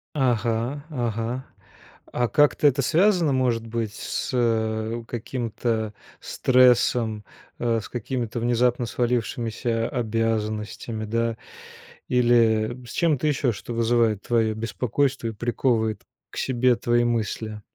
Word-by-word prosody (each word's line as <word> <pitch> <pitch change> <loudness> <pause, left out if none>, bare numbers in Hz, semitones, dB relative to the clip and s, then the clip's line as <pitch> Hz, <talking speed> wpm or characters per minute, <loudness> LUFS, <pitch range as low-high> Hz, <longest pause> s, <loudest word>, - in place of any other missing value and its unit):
Ага, 120 +1 0
ага. 120 -1 -3 0.7
А 120 -1 0
как-то 150 +2 +3
это 140 0 +2
связано, 170 0 +3
может 120 -3 +1
быть, 115 -2 -3
с - - -4 0.8
каким-то 115 -2 -3 0.3
стрессом, 125 -4 +3 0.4
э, 115 -1 +1
с - - -9
какими-то 120 -1 -3
внезапно 120 +1 +1
свалившимися 115 -1 -1
обязанностями, 110 -1 -2
да, 115 +1 -1 0.7
или 120 -3 +3
с 115 - -10
чем-то 155 -4 +1
еще, 140 -3 +1
что 115 +3 -7
вызывает 115 -2 +2
твое 115 -2 +1
беспокойство 125 +3 -1
и - - -2
приковывает 110 -1 0 0.3
к - - -12
себе 125 -1 +2
твои 120 +1 +1
мысли? 110 -2 -2
120 Hz, 110 wpm, -24 LUFS, 110-125 Hz, 0.8 s, как-то